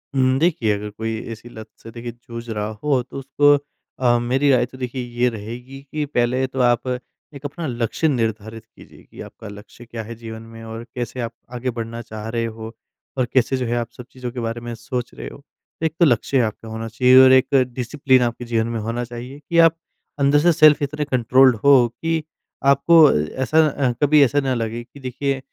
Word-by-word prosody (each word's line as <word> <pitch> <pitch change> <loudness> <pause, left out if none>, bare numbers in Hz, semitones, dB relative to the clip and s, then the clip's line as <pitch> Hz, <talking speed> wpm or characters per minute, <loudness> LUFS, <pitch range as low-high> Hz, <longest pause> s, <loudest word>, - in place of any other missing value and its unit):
उम, 130 0 +3
देखिए 150 -9 +2
अगर 105 +1 -5
कोई 110 +1 -4
ऐसी 115 +2 -9
लत 110 -1 -10 0.2
से 115 - -10
देखिए 120 +1 -7
जूझ 115 0 -10
रहा 105 -2 -2 0.2
हो 140 -4 +2
तो 125 - -10
उसको 145 +2 +3 0.5
अ, 120 -2 +3
मेरी 130 +4 +1
राय 125 -2 +3
तो 125 +2 -14
देखिए 125 0 -4 0.2
ये 125 +1 +4
रहेगी 120 +5 -8
कि 155 -1 -2
पहले 130 -1 0
तो 130 0 -6
आप 120 +1 +2 0.5
एक 145 +1 -11
अपना 155 +3 -4
लक्ष्य 120 +5 -1
निर्धारित 115 -4 -2
कीजिए - - -18
कि - - -13
आपका 110 - -11
लक्ष्य 105 +4 -12
क्या 115 -1 -7
है 115 +2 -8
जीवन 110 -1 -9
में 115 0 -10
और 115 +1 -7
कैसे 125 +1 -4
आप 115 - -3 0.2
आगे 125 +1 -2
बढ़ना 115 0 -5
चाह 110 -1 -8
रहे 115 0 -1
हो, 110 0 -7 0.4
और 130 - +2
कैसे 130 +1 +2
जो 130 - -2
है 120 +1 -1
आप 120 -1 -2
सब 125 - -9
चीज़ों 125 -1 -6
के 125 - -6
बारे 115 0 -3
में 120 0 -6
सोच 120 +1 -5
रहे - - -8
हो। - - -11 0.4
एक 160 -2 0
तो 170 - +6
लक्ष्य 130 0 +2
आपका 110 0 -3
होना 110 +1 -5
चाहिए। 125 +3 +4
और 130 - +7
एक 130 -1 +5 0.3
डिसिप्लिन 130 +1 +2
आपके 120 0 -2
जीवन 115 -1 0
में 115 -1 -3
होना 115 +3 -3
चाहिए 120 +3 -8
कि 170 - 0
आप 165 - -3 0.4
अंदर 140 +1 +4
से 175 +4 +4
सेल्फ़ 155 -1 +6
इतने 150 +1 -2
कंट्रोल्ड 130 -1 +4
हो 140 -1 +7 0.2
कि 165 -1 0 0.4
आपको 140 +4 +5
अ, 150 - +6 0.3
ऐसा 160 +4 +4
अ, 135 -3 0
कभी 150 +1 +5
ऐसा 145 +2 +2
न 130 -1 0
लगे 115 +1 -3
कि 140 +4 -16
देखिए 135 +1 -2
125 Hz, 210 wpm, -21 LUFS, 115-135 Hz, 0.5 s, और